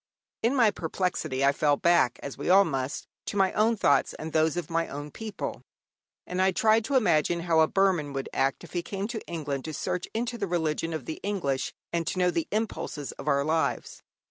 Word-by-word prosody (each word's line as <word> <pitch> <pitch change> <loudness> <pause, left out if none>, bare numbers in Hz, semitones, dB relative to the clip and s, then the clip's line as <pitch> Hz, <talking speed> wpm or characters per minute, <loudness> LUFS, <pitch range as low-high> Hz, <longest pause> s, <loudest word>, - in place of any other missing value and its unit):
In 235 +5 +2
my 230 -5 +5
perplexity 160 -6 -1
I 140 - +6
fell 145 0 +2
back, 170 -8 +3
as 140 - -5
we 140 - -4
all 195 +2 +7
must, 135 -3 -3 0.2
to - - -3
my 190 -1 +3
own 225 +2 +2
thoughts 140 -7 +3
and 160 0 -7
those 160 +1 +2
of 175 -4 -2
my 165 0 0
own 145 +1 -7
people; 220 +3 -5 0.6
and 180 +1 -2
I 190 0 +4
tried 220 +2 +3
to 280 - -1
imagine 170 - +3
how 165 -2 +2
a 160 - +6
Burman 185 -7 +2
would 135 -1 -3
act 135 0 0
if - - -12
he 175 - 0
came 195 +3 -4
to 230 -3 -4
England 145 -5 -3
to 155 -1 -5
search 180 +4 -2
into 235 +1 -3
the 200 - -1
religion 165 -1 -1
of 155 -6 -4
the 155 - -5
English 140 -10 -1 0.2
and 170 -1 -1
to - - -2
know 180 -1 +3
the 165 -2 -1
impulses 210 -9 -3
of - - -10
our 140 -1 +3
lives. 155 -3 -1
165 Hz, 215 wpm, -27 LUFS, 145-195 Hz, 0.6 s, all